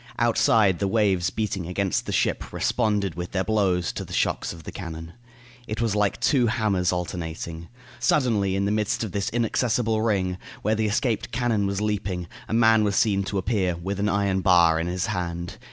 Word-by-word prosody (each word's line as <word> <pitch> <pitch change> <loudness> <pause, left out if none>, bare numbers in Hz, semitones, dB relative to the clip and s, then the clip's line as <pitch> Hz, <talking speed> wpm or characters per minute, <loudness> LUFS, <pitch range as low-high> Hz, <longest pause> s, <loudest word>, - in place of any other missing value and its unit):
Outside, 110 -5 +3
the 100 - 0
waves 95 -5 +2
beating 100 -5 -3
against 95 +1 -1
the - - -2
ship - - 0
responded 105 -6 0
with 90 +1 -6
their 95 -1 +1
blows 95 -5 +1
to - - -5
the - - -10
shocks - - 0
of 85 -1 -10
the - - -7
cannon. 80 -2 -7 0.5
It 110 - -4
was 115 -3 0
like 105 -2 +1
two 130 -5 +3
hammers 100 -5 +1
alternating. 85 -2 -5 0.3
Suddenly, 105 -9 +2
in 100 0 0
the 100 - 0
midst 105 +1 0
of 110 - -4
this 100 0 -1
inaccessible 115 -1 0
ring, 95 -5 0 0.2
where 110 - +2
the 110 0 0
escaped 110 +2 -1
cannon 115 -5 0
was 100 +1 -2
leaping, 95 -4 -2 0.2
a - - -4
man 110 -1 +5
was 100 -1 0
seen 100 -2 +2
to 100 - -3
appear, 95 -3 0
with 95 +4 -4
an 105 +1 +1
iron 100 -2 +1
bar 85 -4 +5
in 85 - -2
his 90 +2 -1
hand. 85 -4 -4
100 Hz, 190 wpm, -25 LUFS, 90-110 Hz, 0.5 s, man